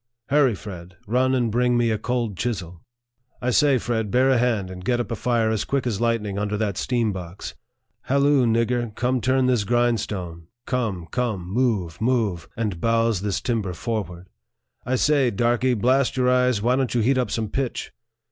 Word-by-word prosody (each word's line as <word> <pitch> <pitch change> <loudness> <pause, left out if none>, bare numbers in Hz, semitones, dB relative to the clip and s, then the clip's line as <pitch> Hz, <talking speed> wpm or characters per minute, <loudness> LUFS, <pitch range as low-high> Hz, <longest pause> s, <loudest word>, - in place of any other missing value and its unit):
" 120 +1 -29
Hurra, 140 -6 +4
Fred.! 90 -3 -9
run 130 +4 +2
and 120 -3 0
bring 125 +1 +2
me 120 -1 +2
a 110 - -1
cold 120 -3 -2
chisel." 90 -7 -4 0.6
"I 125 -1 -1
say, 140 +1 +4
Fred., 110 -3 -2
bear 130 +4 +3
a 130 - +3
hand, 110 -6 0
and 90 0 -9
get 120 +4 +1
up 120 - -3
a - - 0
fire 115 0 +1
as 110 -2 0
quick 140 -2 -1
as 115 -3 -2
light 115 -2 +1
ning 100 -1 -4
under 105 0 -1
that 105 -3 -1
steam 120 -1 0
box." 90 0 -7 0.3
" 110 -1 -51
Halloo, 140 -1 +3
nigger! 115 0 0
come, 125 0 0
turn 130 +1 +2
this 125 -4 +2
grindstone." 100 -8 -1
" 120 - -60
Come, 110 -9 -2
come! 110 -8 -2
move, 100 -6 -1
move! 110 -8 0
and 105 -7 -2
bowse 115 -3 +1
ibis 100 -1 -2
timber 110 -7 -1
forward." 95 -5 -4 0.3
" - - -44
I 130 - +1
say, 140 -1 +3
darky, 120 +3 +1
blast 130 +4 +2
your 125 0 +3
eyes, 125 -4 +2
why 125 +2 +3
don't 130 -2 -1
you 120 - +3
heat 130 +4 +2
up 125 - 0
some 110 -2 -2
pitch 130 +2 -3
115 Hz, 200 wpm, -23 LUFS, 105-125 Hz, 0.6 s, Hurra